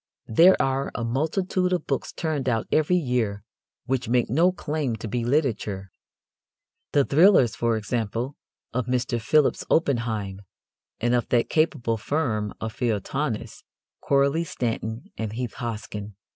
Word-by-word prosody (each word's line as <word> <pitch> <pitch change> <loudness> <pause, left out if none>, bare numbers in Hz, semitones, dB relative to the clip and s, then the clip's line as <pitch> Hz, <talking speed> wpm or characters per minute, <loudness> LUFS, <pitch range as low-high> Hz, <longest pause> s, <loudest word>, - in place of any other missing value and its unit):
There 180 +10 +7
are 135 +1 0
a 120 - -2
multitude 180 - 0
of 180 - 0
books - - -2
turned 155 -6 -2
out 115 -2 0
every 155 +3 +3
year 125 - 0 0.4
which 125 -2 -1
make 120 -2 +2
no 170 +7 +4
claim 150 -8 -2
to 110 - -6
be 120 +3 -2
literature 115 - -1 1.0
the 140 -2 +3
"thrillers," 145 - +5
for 115 -1 +1
example, 115 +4 -2 0.4
of 125 -1 -1
Mr. 125 -1 0
Phillips 150 +5 +3
Oppenheim 115 -10 0 0.6
and 120 +1 +1
of 120 -2 +1
that 120 -1 +2
capable 145 -8 +1
firm 110 -4 -1
of 110 0 -4
feuilletonists, 115 +2 -2 0.4
Coralie 140 +4 +2
Stanton 115 -5 -4
and 110 -1 -3
Heath 120 -2 -4
Hosken. 105 -3 -5
125 Hz, 135 wpm, -25 LUFS, 110-145 Hz, 1.0 s, There